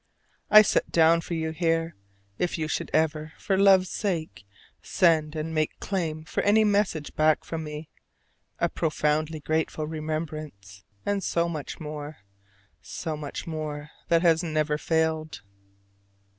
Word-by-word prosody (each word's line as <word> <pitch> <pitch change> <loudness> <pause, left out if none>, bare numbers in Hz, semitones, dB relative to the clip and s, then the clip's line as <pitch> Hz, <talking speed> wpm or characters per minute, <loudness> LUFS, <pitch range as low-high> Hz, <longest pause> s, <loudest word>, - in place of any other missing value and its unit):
I 215 0 +9
set - - 0
down 165 0 +5
for 170 - -4
you 160 -1 -2
here 165 0 0 0.4
if 180 - 0
you 155 -1 -2
should 155 - -3
ever, 155 0 0
for 195 - 0
love's 190 -2 +5
sake, 160 - -3 0.4
send 160 -4 +2
and 155 +1 -3
make 155 -1 -1
claim 160 -5 -3
for - - -2
any 215 +2 +4
message 200 -7 0
back 155 0 +3
from 160 -1 -4
me 150 0 -7 0.7
a - - +2
profoundly 155 0 -1
grateful 155 0 -1
remembrance; 155 -10 -6 0.2
and 200 -1 0
so 170 0 +1
much 155 -4 -5
more, 150 -1 -7 0.6
so 160 -3 -5
much 150 -2 -6
more 150 -2 -5 0.2
that 170 0 +3
has 165 -1 +4
never 155 -3 0
failed. 160 -7 -1
160 Hz, 140 wpm, -26 LUFS, 155-170 Hz, 0.7 s, I